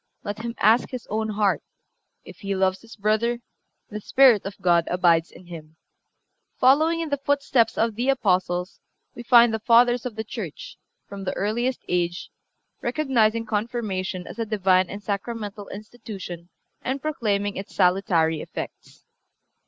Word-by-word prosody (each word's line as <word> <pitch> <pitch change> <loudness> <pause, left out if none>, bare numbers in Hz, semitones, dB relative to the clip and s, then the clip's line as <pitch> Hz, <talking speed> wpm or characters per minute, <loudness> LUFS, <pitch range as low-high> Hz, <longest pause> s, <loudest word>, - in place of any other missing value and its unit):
Let 205 +1 -5
him 230 +1 -5
ask 225 +4 +4
his 250 -3 -6
own 220 +1 -1
heart; 205 -1 +1 0.6
if - - -12
he 200 -1 -3
loves 190 0 +1
his 230 -1 -13
brother, 220 +3 +1 0.5
the 210 0 -5
Spirit 255 -3 +5
of 195 - -8
God 170 -2 +3
abides 170 -2 +2
in 185 - -15
him."(358) 160 -2 -16
Following 310 +6 +4
in 325 - -3
the 285 - 0
footsteps 275 -5 +1
of 230 0 +1
the 240 +5 -1
Apostles 185 -7 0 0.3
we - - -9
find 240 -1 +6
the 220 - -1
Fathers 240 +2 +4
of 235 - -8
the 220 - -3
Church, 215 - -7 0.3
from 200 -1 -8
the 185 - -3
earliest 240 +6 -1
age, 175 0 -2 0.5
recognizing 235 -4 +1
Confirmation 210 -5 -3
as - - -10
a 230 - 0
Divine 185 -3 +2
and 205 +1 -7
sacramental 205 0 -4
institution 200 -5 -9 0.3
and 265 +2 -2
proclaiming 205 -9 -1
its 195 - -8
salutary 180 -4 +2
effects. - - -9
215 Hz, 150 wpm, -24 LUFS, 185-235 Hz, 0.6 s, find